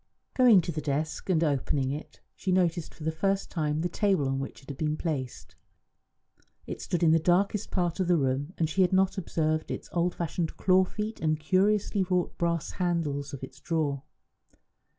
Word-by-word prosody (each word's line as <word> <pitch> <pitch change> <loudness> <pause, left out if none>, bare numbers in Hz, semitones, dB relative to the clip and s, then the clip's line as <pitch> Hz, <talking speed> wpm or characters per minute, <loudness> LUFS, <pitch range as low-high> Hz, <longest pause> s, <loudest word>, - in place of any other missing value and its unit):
Going 240 -7 +6
to 170 - -4
the 155 -1 -3
desk, 150 +5 -2
and 170 -3 +3
opening 140 -2 0
it, 150 +3 -7
she 185 - -2
noticed 175 -2 +1
for 155 - -12
the 160 - 0
first 195 +5 -1
time 155 -2 -1
the 175 - +1
table 190 -5 +1
on 135 0 -1
which 135 0 -7
it 135 - -15
had 140 - -6
been 155 -1 0
placed. 140 -8 -4 1.1
It - - -6
stood 175 -1 -1
in 160 - +5
the 165 - +5
darkest 190 +5 +1
part 175 -1 -1
of 185 - +1
the 175 -1 +4
room, 135 +2 0
and 160 - +1
she 175 +5 0
had 185 0 +3
not 190 +1 +3
observed 155 -3 -1
its - - -5
old 175 +1 0
fashioned 170 0 -3
claw 185 0 +4
feet 215 +3 -5
and 155 -1 +2
the - - -12
curiously 195 +5 +2
wrought 180 -1 0
brass 170 -2 0
handles 165 -6 -1
of 135 -2 -8
its 130 - -9
drawer. 150 -5 -1
165 Hz, 195 wpm, -28 LUFS, 150-185 Hz, 1.1 s, Going